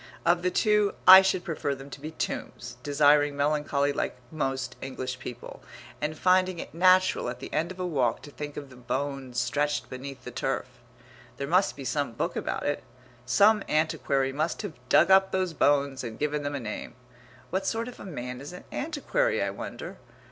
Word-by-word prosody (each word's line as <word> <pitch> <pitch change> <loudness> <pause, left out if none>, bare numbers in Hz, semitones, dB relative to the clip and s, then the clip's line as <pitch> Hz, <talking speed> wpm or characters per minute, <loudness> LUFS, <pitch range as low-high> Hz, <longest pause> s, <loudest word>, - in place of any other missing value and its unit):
Of 175 +1 +3
the 180 - +1
two 210 +1 +2
I 190 +1 +12
should 190 -2 0
prefer 155 -5 -2
them 135 +1 -11
to 140 - -9
be 155 - -5
tombs, 160 - -5
desiring 145 0 +3
melancholy 145 -1 +1
like - - -2
most 135 -4 -2
English 130 -1 -5
people, 125 -1 -8 0.4
and 155 +1 -2
finding 185 +1 +3
it - - -7
natural 185 -3 +4
at 125 0 -6
the - - -8
end 170 +3 0
of 185 - -10
a 180 - -1
walk 130 -9 0
to 145 - -10
think 145 0 -7
of 140 -2 -7
the - - -13
bones 130 0 -3
stretched 145 +4 -1
beneath 130 0 -7
the 125 - -7
turf.... 135 +2 -2 0.7
There 140 - -3
must 185 +5 +3
be 140 - -8
some 140 -1 -1
book - - -2
about - - -3
it. - - -1 0.4
Some 205 - +5
antiquary 140 -3 +1
must 155 +7 -2
have 200 -6 -5 0.2
dug 170 +5 +5
up 190 0 +6
those 185 -2 0
bones 140 -3 +2
and 115 -2 -6
given 150 0 -1
them 145 0 -3
a - - -2
name.... 110 -2 -6 0.6
What 190 +2 -1
sort 230 +1 -1
of 250 - -10
a - - -8
man 125 -6 -6
is 145 +5 -8
an 180 - -10
antiquary, 330 - 0
I - - 0
wonder? - - -7
145 Hz, 190 wpm, -27 LUFS, 135-180 Hz, 0.7 s, I